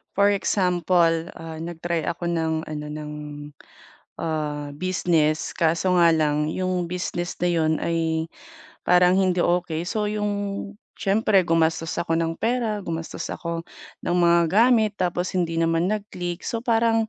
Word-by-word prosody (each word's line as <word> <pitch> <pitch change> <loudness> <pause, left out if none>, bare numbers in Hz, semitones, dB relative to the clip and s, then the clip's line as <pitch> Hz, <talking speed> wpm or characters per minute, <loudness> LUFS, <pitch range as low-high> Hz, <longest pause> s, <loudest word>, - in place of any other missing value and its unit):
For 200 +1 +4
example, 175 -4 +2
ah, 160 -1 -8
nag-try 170 0 -3
ako 170 +1 -2
ng 160 -1 0
ano, 150 -1 -5
ng, 150 0 -6 1.1
ah, 150 -2 -2
business 165 -3 +1
kaso 170 +3 +1
nga 170 -1 +6
lang 150 -1 +1
yung 185 -2 -1
business 175 -1 -3
na 175 - +2
'yon 160 -2 +2
ay 160 -1 0 0.6
parang 180 0 +5
hindi 185 -2 +2
okey. 175 -2 0
So, 215 -2 -1
yung 210 -1 -1 0.7
siyempre 200 -1 +3
gumastos 165 0 +1
ako 165 -1 0
ng 165 0 -1
pera, 230 -2 0
gumastos 165 -1 -4
ako 170 -1 -4 0.4
ng 175 - 0
mga 170 -1 +5
gamit 220 0 +4
tapos 180 0 -1
hindi 165 -2 0
naman 165 +2 +2
nag-click 180 -4 -4
so, 230 - -2
parang 225 -1 +2
170 Hz, 135 wpm, -24 LUFS, 165-185 Hz, 1.1 s, nga